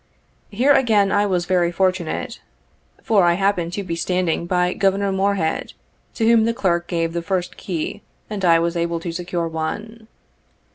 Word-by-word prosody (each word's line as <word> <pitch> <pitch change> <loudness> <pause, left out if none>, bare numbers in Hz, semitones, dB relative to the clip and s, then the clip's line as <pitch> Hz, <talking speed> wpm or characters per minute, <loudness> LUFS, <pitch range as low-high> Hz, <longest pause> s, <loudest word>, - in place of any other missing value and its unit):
Here 245 +8 +2
again 215 -7 +3
I 205 0 +2
was 180 -3 0
very 175 -2 +1
fortunate, 185 -2 -1 0.6
for 205 -4 +3
I 175 0 +4
happened 190 -3 0
to 200 - -3
be 170 -3 -4
standing 175 -1 -1
by 180 0 +1
Governor 195 0 +1
Morehead, 190 -4 -1 0.4
to 225 - 0
whom 225 -1 +5
the 230 0 0
clerk 175 -7 0
gave 165 -1 -1
the 170 - -2
first 180 0 -2
key, 180 +3 -4 0.3
and 205 -2 -5
I 170 -2 +5
was 170 +1 -1
able 170 0 -1
to 170 +1 -5
secure 175 0 -3
one. 215 +8 -5
185 Hz, 170 wpm, -21 LUFS, 170-200 Hz, 0.6 s, whom